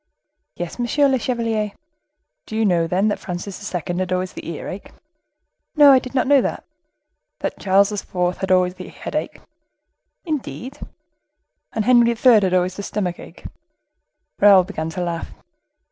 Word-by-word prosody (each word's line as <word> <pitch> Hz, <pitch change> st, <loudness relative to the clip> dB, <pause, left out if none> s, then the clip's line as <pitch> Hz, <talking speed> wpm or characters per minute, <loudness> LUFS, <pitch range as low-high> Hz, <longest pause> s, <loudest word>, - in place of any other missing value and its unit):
"Yes, 175 Hz, +6 st, -6 dB
monsieur 280 Hz, +4 st, +2 dB
le 265 Hz, -2 st, +1 dB
chevalier." 225 Hz, -4 st, -1 dB, 0.7 s
"Do 220 Hz, -, -6 dB
you 220 Hz, 0 st, +1 dB
know, 170 Hz, -4 st, +2 dB
then, 185 Hz, +5 st, +1 dB
that 205 Hz, -, -2 dB
Francis 190 Hz, +3 st, -6 dB
II. 175 Hz, -3 st, -3 dB, 0.2 s
had 185 Hz, -1 st, -2 dB
always 185 Hz, 0 st, -1 dB
the -, -, -8 dB
earache?" 180 Hz, +4 st, -7 dB, 0.9 s
"No, 290 Hz, -2 st, +8 dB
I 265 Hz, -, +7 dB
did 255 Hz, +1 st, -10 dB
not 255 Hz, -, +2 dB
know 280 Hz, 0 st, +5 dB
that." -, -, -3 dB, 0.8 s
"That -, -, -3 dB
Charles 195 Hz, +1 st, +3 dB
IV. 180 Hz, -3 st, -2 dB
had 190 Hz, -, -3 dB
always 180 Hz, -1 st, +3 dB
the 185 Hz, 0 st, -10 dB
headache?" -, -, -5 dB, 0.8 s
"Indeed!" 285 Hz, -4 st, -5 dB, 0.9 s
"And 220 Hz, -2 st, -1 dB
Henry 240 Hz, -2 st, +5 dB
III. 245 Hz, +2 st, +5 dB
had 185 Hz, -2 st, 0 dB
always 185 Hz, +1 st, 0 dB
the -, -, -4 dB
stomach 190 Hz, -3 st, -3 dB
ache?" -, -, -13 dB, 0.9 s
Raoul 200 Hz, -2 st, +7 dB
began 165 Hz, -4 st, -5 dB
to 175 Hz, +2 st, -4 dB
laugh. 170 Hz, -1 st, -5 dB
200 Hz, 155 wpm, -21 LUFS, 180-240 Hz, 0.9 s, No